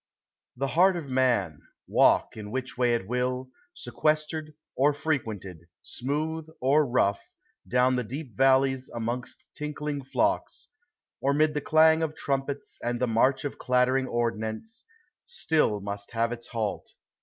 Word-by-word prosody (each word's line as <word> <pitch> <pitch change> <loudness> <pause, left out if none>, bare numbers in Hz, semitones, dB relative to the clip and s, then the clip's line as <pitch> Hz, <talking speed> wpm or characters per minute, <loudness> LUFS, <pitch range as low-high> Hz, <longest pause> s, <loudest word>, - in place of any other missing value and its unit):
The 135 +1 -1
heart 185 +5 +4
of 150 -5 -6
man, 120 - +1 0.3
walk - - +3
in 105 -1 -7
which 130 +3 -4
way 125 -2 +2
it 95 -5 -4
will, 125 +2 -2 0.2
Sequestered 155 0 -1 0.2
or 145 +3 +3
frequented, 110 - -3 0.2
smooth 155 +4 -3
or 140 +3 +3
rough, 120 -5 +2 0.5
Down 125 +1 +3
the 125 - 0
deep 130 +1 -7
valleys 130 0 +3
amongst 120 +2 -5
tinkling 150 -1 -4
flocks, 135 - -1 0.5
Or 140 +1 +2
mid 155 +1 +3
the 150 - -1
clang 160 +2 +5
of 160 -1 -2
trumpets 140 0 -3
and 120 0 -2
the 125 - +2
march 130 +4 +2
Of 145 - -5
clattering 130 +1 +2
ordnance, 120 - -3 0.4
si 470 - -4
ill 105 -8 +3
must 100 +1 -6
have 115 +1 +1
its 120 -1 -6
halt. 110 -3 -4
130 Hz, 145 wpm, -27 LUFS, 120-150 Hz, 0.5 s, clang